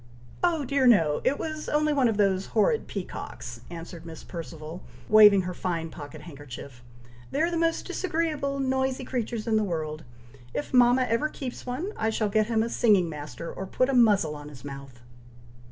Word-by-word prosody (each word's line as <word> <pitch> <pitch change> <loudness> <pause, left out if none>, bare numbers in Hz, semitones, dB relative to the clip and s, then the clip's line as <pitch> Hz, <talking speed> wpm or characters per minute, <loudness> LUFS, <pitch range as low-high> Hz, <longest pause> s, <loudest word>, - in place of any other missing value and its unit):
"Oh 330 -5 +2
dear, 270 0 +2
no! 165 -11 +4
it 285 - +2
was 310 -1 -4
only 300 0 +2
one 270 -4 +3
of 225 -3 0
those 195 -2 +2
horrid 220 +1 +3
peacocks," 120 - -6
answered 170 0 -8
Miss 165 -2 -9
Perceval, 165 0 -8 0.3
waving 210 -3 +8
her 180 0 -4
fine 170 -3 -3
pocket 150 0 -9
handkerchief. 140 -5 -10 0.5
"They 280 - -2
are 340 - +1
the - - -1
most 330 0 +1
disagreeable, 310 -6 -1
noisy 265 0 0
creatures 235 -3 -3
in 225 -2 +2
the 215 - +2
world! 155 -4 -3 0.5
If 145 - -3
mama 250 +1 +6
ever 250 +5 0
keeps 255 -4 -7
one, 310 +12 -3
I 220 - +1
shall 220 -1 0
get 215 +1 +2
him 225 -1 +2
a 230 - -2
singing 205 -8 +3
master, 150 0 -7
or 190 - -6
put 255 +7 +1
a - - +1
muzzle 205 -10 +4
on 145 0 -9
his 140 -2 -12
mouth!" 135 -3 -9
215 Hz, 185 wpm, -27 LUFS, 160-260 Hz, 0.5 s, waving